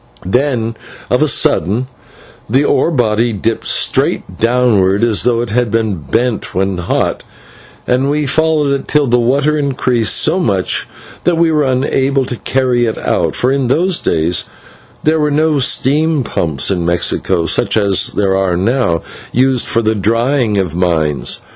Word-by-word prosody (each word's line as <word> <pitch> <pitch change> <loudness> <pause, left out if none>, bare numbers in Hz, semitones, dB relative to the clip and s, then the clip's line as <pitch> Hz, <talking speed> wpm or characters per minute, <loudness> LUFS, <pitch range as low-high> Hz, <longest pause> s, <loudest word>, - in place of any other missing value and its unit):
Then 115 +1 0 0.4
of - - +2
a - - +3
sudden 115 +8 +1 0.6
the 130 +6 +2
ore - - +2
body 120 -5 +1
dipped 110 +3 -2
straight - - 0
downward, 115 -4 +2
as 115 -3 +2
though 120 -1 +2
it 120 -3 -4
had 120 0 0
been 110 -3 -1
bent 115 +9 -1
over - - -9
when 95 -1 0
hot, 90 - -1 0.6
and 130 +3 +1
we 150 +1 0
followed 155 0 +1
it 140 - -4
till 150 -1 +2
the 120 -1 +2
water 140 +5 +1
increased 125 -5 0
so 165 +4 +2
much 100 - 0 0.4
that 175 -2 +1
we 165 -1 +2
were 155 -1 +2
unable 135 +1 0
to 125 - -3
carry 125 0 0
it 110 - -2
out, - - -1
for 125 - +1
in 135 -2 0
those 170 +7 +1
days 80 +2 0 0.6
there 155 +1 +2
were 150 -1 +1
no 150 0 +1
steam 145 +3 +1
pumps 80 - -1
in 90 -3 -1
Mexico, 85 0 0
such - - +1
as 100 -3 +1
are 95 -3 +1
now 95 -4 0 0.3
used 130 0 +1
for 115 - +1
the 110 0 +1
drying 115 +2 0
of 90 -4 -1
mines. 80 -8 -1
120 Hz, 160 wpm, -14 LUFS, 100-140 Hz, 0.6 s, a